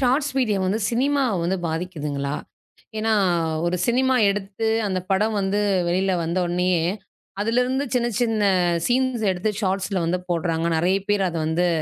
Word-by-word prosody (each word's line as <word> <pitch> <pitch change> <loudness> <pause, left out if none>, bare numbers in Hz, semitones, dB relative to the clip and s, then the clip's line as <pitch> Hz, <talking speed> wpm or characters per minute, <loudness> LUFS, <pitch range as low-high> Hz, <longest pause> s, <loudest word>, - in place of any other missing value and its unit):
Shorts 270 +3 +1
video 215 -6 +1
வந்து 210 +4 0
cinema 275 +4 +1 0.2
வந்து 180 +3 0
பாதிக்குதுங்களா? 150 -4 -3 0.6
ஏன்னா, 220 0 +1 0.5
ஒரு 180 +1 0
சினிமா 260 +2 +2
எடுத்து 205 +2 -3 0.2
அந்த 185 -1 -1
படம் 210 +3 +1
வந்து 195 +2 0 0.3
வெளியில 190 +2 +1
வந்தவுடனேயே 175 0 0 0.6
அதுல 230 +4 +1
இருந்து 265 +3 -1
சின்ன 240 -1 +1
சின்ன 225 -3 +1 0.4
சீன்ஸ் 255 -1 +1
எடுத்து 185 +4 -1
ஷார்ட்ஸ்ல 195 -1 -1
வந்து 175 +2 0
போடுறாங்க. 165 -1 0
நறைய 180 +4 +2
பேர் 205 -2 +2
அத 170 - -5
வந்து 170 +3 +1
195 Hz, 140 wpm, -23 LUFS, 175-230 Hz, 0.6 s, சினிமா